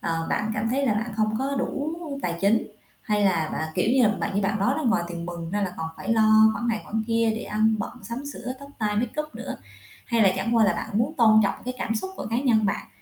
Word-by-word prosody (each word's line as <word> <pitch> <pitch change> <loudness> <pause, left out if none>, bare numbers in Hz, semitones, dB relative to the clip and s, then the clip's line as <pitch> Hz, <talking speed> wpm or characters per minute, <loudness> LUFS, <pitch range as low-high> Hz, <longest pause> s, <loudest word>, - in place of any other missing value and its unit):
ờ, 165 -1 -2
bạn 215 - 0
cảm 220 +1 -1
thấy 275 +1 +1
là 215 - +2
bạn 220 +2 -2
không 215 0 +1
có 275 +1 -1
đủ 290 +4 -2 0.3
tài 170 -1 -1
chính 210 +3 +3 0.4
hay 210 -1 +1
là 170 -5 +2
bạn 160 - -2
kiểu 190 +5 +1
như, 260 -1 +4
là 215 - +6
bạn 200 - -2
như 200 - +1
bạn 215 +2 0
nói 245 +7 +2
đó, 315 - -2
ngoài 225 -6 +2
tiền 170 0 -6
mừng 170 -1 -6
ra 205 +2 -1
là 185 -2 -2
còn 160 0 -3
phải 220 +4 -2
lo 220 0 +6
khoản 235 +1 -3
này 220 -2 0
khoản 220 +1 -2
kia 230 -1 +2
để 230 - -4
ăn 220 +1 +2
bận, 200 - -3
sắm 235 +7 -6
sửa, 250 -1 -5
tóc, 280 0 -11
tai, 210 -1 0
makeup 300 +7 -2
nữa? - - -6 0.5
Hay 235 -2 0
là 190 -2 +5
chẳng 230 +5 0
qua 225 - +6
là 205 - +3
bạn 220 - -5
muốn 275 +7 0
tôn 220 -4 +6
trọng 200 - +1
cái 255 - -3
cảm 225 - -1
xúc 380 +12 -3
của - - -5
cá 230 - +1
nhân 235 -5 +3
bạn 195 - -2
220 Hz, 270 wpm, -25 LUFS, 200-235 Hz, 0.5 s, là